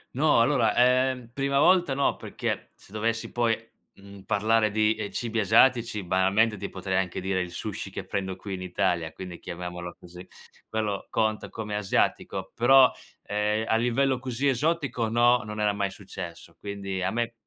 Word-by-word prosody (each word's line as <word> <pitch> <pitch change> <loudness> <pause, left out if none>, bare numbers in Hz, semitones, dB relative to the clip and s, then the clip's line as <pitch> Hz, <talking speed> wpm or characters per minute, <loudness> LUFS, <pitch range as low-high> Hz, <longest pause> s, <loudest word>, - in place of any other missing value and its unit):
No, 150 -3 +4
allora 120 -2 +2
,ehm, 125 0 +2
prima 140 +1 0
volta 175 -1 +4
no, 140 - +1
perché, - - -4
se - - -18
dovessi 115 +1 -2
poi, 115 -2 +1 0.4
mhmm, 100 0 -13
parlare 110 +2 +2
di, 110 +1 +2
ehm, 110 -2 -5
cibi 115 0 -2
asiatici, 115 +1 +3
banalmente 95 +5 +2
ti 100 - -6
potrei 95 0 -2
anche 95 -2 -1
dire 95 0 -1
il 90 - -4
sushi 100 +3 -5
che 95 -1 -7
prendo 95 -1 -3
qui 100 0 -7
in 95 - -5
Italia, 90 -3 -1
quindi 90 -1 -9
chiamiamolo 90 0 -6
così, 90 +1 -12 0.4
quello 105 -3 -2
conta 110 -1 -1
come 105 -2 -5
asiatico, 105 -2 -1
però, 130 +1 +6 0.3
ehm, 105 +1 0
a - - +2
livello 125 +2 +1
così 130 +2 -2
esotico 140 -3 0
no, 120 +2 +4
non 105 0 -6
era 105 -1 +2
mai 100 -1 -1
successo. 95 -3 -9
Quindi 100 -2 -5
a 95 - 0
me 120 +3 -2
110 Hz, 170 wpm, -26 LUFS, 95-120 Hz, 0.4 s, però